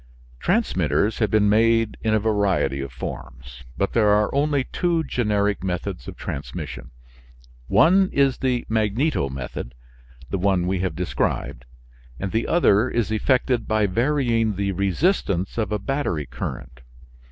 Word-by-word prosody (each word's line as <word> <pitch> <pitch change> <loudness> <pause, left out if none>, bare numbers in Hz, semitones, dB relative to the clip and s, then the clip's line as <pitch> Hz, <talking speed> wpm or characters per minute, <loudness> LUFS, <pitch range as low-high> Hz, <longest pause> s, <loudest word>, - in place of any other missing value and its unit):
Transmitters 105 - +1
have 110 -3 +2
been 105 0 +3
made 115 +1 +3
in 110 - 0
a 110 - +3
variety 100 -10 +1
of 70 -2 -6
forms, 65 0 -8
but 100 - -1
there 110 -3 +3
are 105 0 +3
only 140 -1 +1
two 170 +4 0
generic 105 -7 0
methods 95 0 -4
of - - -8
transmission. 60 0 -6 0.8
One 180 - +4
is 140 -2 +2
the 125 -2 0
magneto 110 - 0
method 65 -2 -6 0.6
the 95 - -1
one 95 -2 +1
we 95 0 0
have 95 0 -2
described 85 -8 -2 0.5
and 95 -1 -3
the 115 +1 0
other 125 -9 +3
is 115 -2 -1
effected 125 +1 +1
by 110 -1 +2
varying 115 0 +1
the 100 0 -1
resistance 100 - 0
of 110 - -1
a 105 - +1
battery 100 - -2
current. - - -7
105 Hz, 140 wpm, -23 LUFS, 90-120 Hz, 0.8 s, One